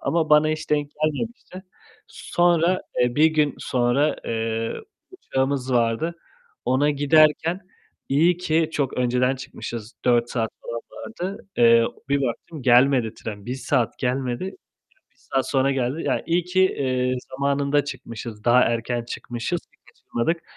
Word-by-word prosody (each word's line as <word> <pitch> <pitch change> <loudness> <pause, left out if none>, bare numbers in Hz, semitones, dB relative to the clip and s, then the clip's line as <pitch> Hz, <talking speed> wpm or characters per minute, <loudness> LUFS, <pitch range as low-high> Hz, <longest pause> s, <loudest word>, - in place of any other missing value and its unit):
Ama 160 -2 0
bana 150 0 +6
hiç 155 0 -3
denk 145 -1 +1
gelmemişti. 185 +4 -3 0.5
Sonra, 175 +1 +1 0.2
eee, 125 0 +2
1 155 +2 +6
gün 155 -3 +2
sonra, 125 +4 +1
eee, 115 0 -2 0.4
uçağımız 135 - -2
vardı. 120 +8 +1 0.5
Ona 140 +3 +2
giderken, 155 +4 +3 0.5
iyi 165 +6 +3
ki 165 -2 +1
çok 140 -4 -1
önceden 125 +1 +1
çıkmışız, 115 -3 -7
4 120 -1 +3
saat 115 -3 -1
falan 115 0 -5
vardı. 195 -3 -7
Eee, 115 -1 +6 0.2
bir 140 0 +1
baktım, 135 +4 -4
gelmedi 125 -2 +4
tren, 105 -2 -8
1 125 - -2
saat 125 -2 -1
gelmedi. 125 +2 -1
Ya, 190 - -4 0.6
1 - - -39
saat 135 -1 -2
sonra 135 0 +2
geldi. 135 +4 -1
Ya, - - 0
iyi 170 +1 +1
ki, 180 +2 +1
eee, 130 -8 +1
zamanında 140 +1 +1
çıkmışız, 115 -5 -7
daha 120 +1 +6
erken 120 0 0
çıkmışız 120 +8 -4
ki - - -33
kaçırmadık. 165 +8 -3
135 Hz, 140 wpm, -23 LUFS, 120-155 Hz, 0.6 s, bana